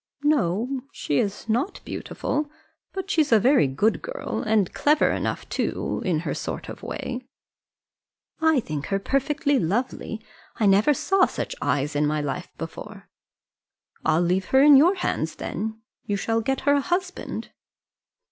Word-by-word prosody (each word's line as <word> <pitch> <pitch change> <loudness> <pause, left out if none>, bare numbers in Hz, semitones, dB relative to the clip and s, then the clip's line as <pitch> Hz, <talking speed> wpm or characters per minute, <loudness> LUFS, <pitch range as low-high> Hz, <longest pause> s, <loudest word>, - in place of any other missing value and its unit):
"No, 255 - +1
she's 200 +10 -1
not 245 - 0
beautiful; 295 0 -3 0.4
but 385 +1 -4
she's 310 -7 +2
a 225 - +7
very 255 - +4
good 175 +12 +1
girl, - - -4
and 215 -4 +1
clever 300 +1 +3
enough - - -2
too, - - -2
in 170 -5 0
her - - -2
sort - - -5
of - - -8
way." 255 0 -5 1.1
"I 320 -5 +4
think 150 -7 -5
her 195 - +1
perfectly 280 +6 +1
lovely. 220 +4 -2 0.4
I 220 - 0
never 205 +9 +5
saw 390 +7 +3
such - - -4
eyes 145 +1 0
in 145 +1 +2
my 150 +1 0
life 140 -3 -3
before." - - -8 0.9
"I'll 160 +2 +3
leave 185 +2 +1
her 265 +6 +4
in 290 -1 +9
your 335 +8 +6
hands 160 - -2
then; 220 +4 -4 0.3
you 205 - 0
shall 225 +3 0
get 270 +4 -1
her 285 - +3
a 285 - +3
husband." 365 +4 -3
230 Hz, 150 wpm, -25 LUFS, 185-290 Hz, 1.1 s, in